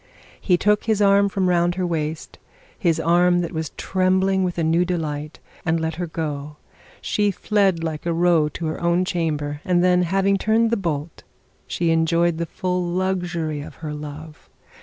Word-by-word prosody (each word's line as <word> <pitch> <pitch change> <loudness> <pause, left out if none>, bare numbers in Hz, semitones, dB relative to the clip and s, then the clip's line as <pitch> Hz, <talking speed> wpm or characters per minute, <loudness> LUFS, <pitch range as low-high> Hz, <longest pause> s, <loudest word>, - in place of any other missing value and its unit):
He 180 -3 +3
took 210 +2 +2
his 220 -2 +1
arm 200 0 +4
from 195 -2 0
round 175 -1 +2
her 185 -1 -1
waist, 160 -2 -4 0.4
his 170 -6 +1
arm 175 +1 +3
that 170 - -4
was 160 -3 -3
trembling 190 +1 +1
with 180 -1 -2
a 165 - 0
new 165 +2 +3
delight, 155 -4 -3 0.3
and 165 0 +1
let 160 0 -3
her 175 - -2
go. 150 -2 -5 0.4
She 205 -1 +1
fled 195 -3 +1
like 160 0 -4
a - - +1
roe 165 -2 +3
to 165 - -6
her 155 - -3
own 170 +1 +2
chamber, 150 -5 -2
and 180 -1 +2
then, 180 0 +4
having 195 +2 +1
turned 225 +2 +2
the - - +3
bolt, 165 -6 -4 0.5
she 170 -1 0
enjoyed 165 +1 +2
the 170 - -2
full 180 +2 -2
luxury 175 -4 -2
of - - -10
her 150 - -3
love. 150 +1 -9
175 Hz, 180 wpm, -22 LUFS, 160-185 Hz, 0.5 s, arm